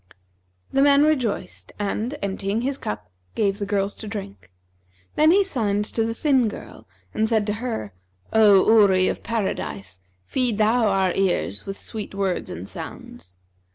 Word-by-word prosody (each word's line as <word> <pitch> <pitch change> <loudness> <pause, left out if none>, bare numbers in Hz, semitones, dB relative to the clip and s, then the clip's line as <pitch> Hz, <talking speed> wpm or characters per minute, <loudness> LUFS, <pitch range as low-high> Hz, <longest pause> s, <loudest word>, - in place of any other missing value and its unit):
The 270 - +3
man 280 0 +6
rejoiced 265 -9 -1
and, 215 +7 -2
emptying 200 +2 -2
his 275 +2 -2
cup, 105 -3 -6 0.2
gave 200 -1 0
the 200 - -3
girls 200 0 0
to 220 - -8
drink. 100 - -7 0.6
Then 310 +1 +4
he 395 +4 +5
signed 210 - -1
to 225 +1 -1
the 225 0 -2
thin 265 -4 +2
girl 210 - -9 0.3
and 220 0 +1
said 220 -3 +2
to 210 - -1
her, 165 - -4 0.4
'O 205 -3 +6
Houri 200 -4 +5
of - - -4
Paradise, 100 - -3 0.3
feed 245 - 0
thou 220 +2 +3
our 190 -2 +2
ears 180 - -1
with 195 - -5
sweet 215 -3 -7
words 195 -2 -1
and 90 +3 -7
sounds.' 90 -1 -10
210 Hz, 155 wpm, -23 LUFS, 195-235 Hz, 0.6 s, man